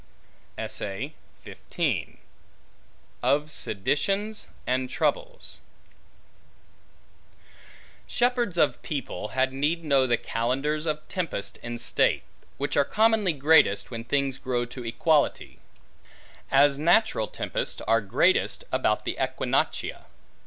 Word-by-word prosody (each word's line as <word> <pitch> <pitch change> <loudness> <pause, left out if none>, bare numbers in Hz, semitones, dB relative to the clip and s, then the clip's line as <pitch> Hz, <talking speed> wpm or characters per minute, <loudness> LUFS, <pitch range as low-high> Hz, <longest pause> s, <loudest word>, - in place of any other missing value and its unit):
Of - - -4 2.8
Seditions 195 - 0 0.2
And 130 0 0
Troubles - - -2 2.5
SHEPHERDS 240 -6 +1
of 150 - +2
people, 140 -7 -4
had 130 +3 0
need 150 +5 0
know 140 -4 +3
the 120 -1 +2
calendars 135 +9 -1
of 155 0 -2
tempests 100 - -3
in 120 0 -5
state; - - +1 0.3
which 140 - -2
are 145 - +5
commonly 215 0 +2
greatest, 145 -8 +4
when 115 -1 -5
things 135 +1 -1
grow 125 -2 -1
to 125 +1 -8
equality; 140 +6 +1 0.9
as 140 0 +4
natural 170 - +3
tempests - - -3
are 115 +1 +2
greatest 100 - +2
about - - +1
the - - -2
Equinoctia. - - -1
140 Hz, 95 wpm, -26 LUFS, 120-170 Hz, 2.8 s, are